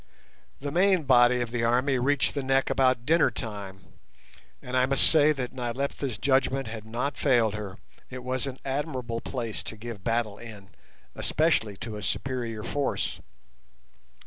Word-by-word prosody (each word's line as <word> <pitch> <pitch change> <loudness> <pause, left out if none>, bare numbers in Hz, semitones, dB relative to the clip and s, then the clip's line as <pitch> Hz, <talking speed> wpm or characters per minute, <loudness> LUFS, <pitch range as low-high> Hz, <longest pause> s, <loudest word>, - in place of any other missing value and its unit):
The 145 +1 -4
main 185 +1 +3
body 125 -2 +5
of 120 -1 -3
the 120 -1 -1
army 125 +3 +2
reached 140 +2 +2
the 140 - -2
neck 135 0 +1
about 130 -2 +2
dinner 165 +3 +4
time, 100 -4 -7 0.8
and 125 - -6
I 130 0 +4
must 135 0 +5
say 155 -1 +5
that 130 -4 -3
Nyleptha's 130 0 -3
judgment 135 0 +1
had 110 -1 -7
not 120 +6 -3
failed 115 -4 +3
her, 105 -3 -6 0.3
it 130 -1 -7
was 130 +2 -1
an 130 -1 -5
admirable 130 -4 -3
place 115 -4 -4
to 110 - -8
give 110 -3 -8
battle 115 -3 -1
in, 105 -4 -11 0.4
especially 140 -10 +1
to 115 -1 -6
a - - -7
superior 115 0 -2
force. 145 -1 -2
125 Hz, 155 wpm, -27 LUFS, 115-135 Hz, 0.8 s, body